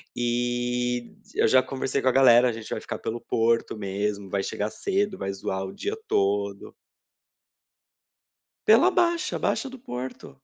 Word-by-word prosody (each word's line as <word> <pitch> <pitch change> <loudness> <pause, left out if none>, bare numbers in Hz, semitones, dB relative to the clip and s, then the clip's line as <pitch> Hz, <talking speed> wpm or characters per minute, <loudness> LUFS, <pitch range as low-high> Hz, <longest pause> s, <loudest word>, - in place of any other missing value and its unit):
E 120 0 -1 0.2
eu - - +3
já 130 +3 +6
conversei 135 +1 -2
com 130 - -1
a - - +6
galera, 125 -2 +6
a - - 0
gente 110 -1 -8
vai - - -3
ficar - - -6
pelo 115 +1 -4
Porto 115 0 +1
mesmo, 100 0 -3
vai 100 0 -1
chegar 105 +1 -2
cedo, 200 0 -1
vai 95 - -3
zoar 95 0 -3
o 95 - -7
dia 420 +2 -3
todo. 100 0 0 1.9
Pela 235 +13 +6
Baixa, 345 -2 +1
a - - -3
Baixa 270 - -1
do 265 - -10
Porto. 130 - -7
120 Hz, 160 wpm, -26 LUFS, 105-135 Hz, 1.9 s, já